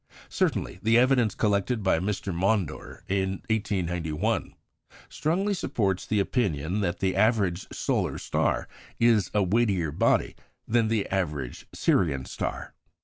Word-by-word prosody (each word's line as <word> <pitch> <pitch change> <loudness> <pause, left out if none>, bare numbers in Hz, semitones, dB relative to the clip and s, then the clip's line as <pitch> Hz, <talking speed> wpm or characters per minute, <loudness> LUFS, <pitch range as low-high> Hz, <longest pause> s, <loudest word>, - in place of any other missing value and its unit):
Certainly, 90 - -1
the 115 +1 +4
evidence 125 -3 +3
collected 105 +2 0
by 95 -4 +3
Mr. 95 0 -2
Maunder 95 -2 -1
in 95 0 -1
1891 90 -2 -1 0.5
strongly 190 +7 0
supports 100 - -1
the 105 - +1
opinion 95 - 0
that 85 -3 -2
the 95 -1 +1
average 100 -4 +2
solar - - -1
star - - 0 0.3
is 115 -5 +4
a 105 - +4
weightier 95 -5 +1
body 75 - +1 0.3
than 115 -1 +2
the 110 -2 0
average 75 -10 -3
Sirian 70 -8 +1
star. - - -5
100 Hz, 125 wpm, -27 LUFS, 90-110 Hz, 0.5 s, the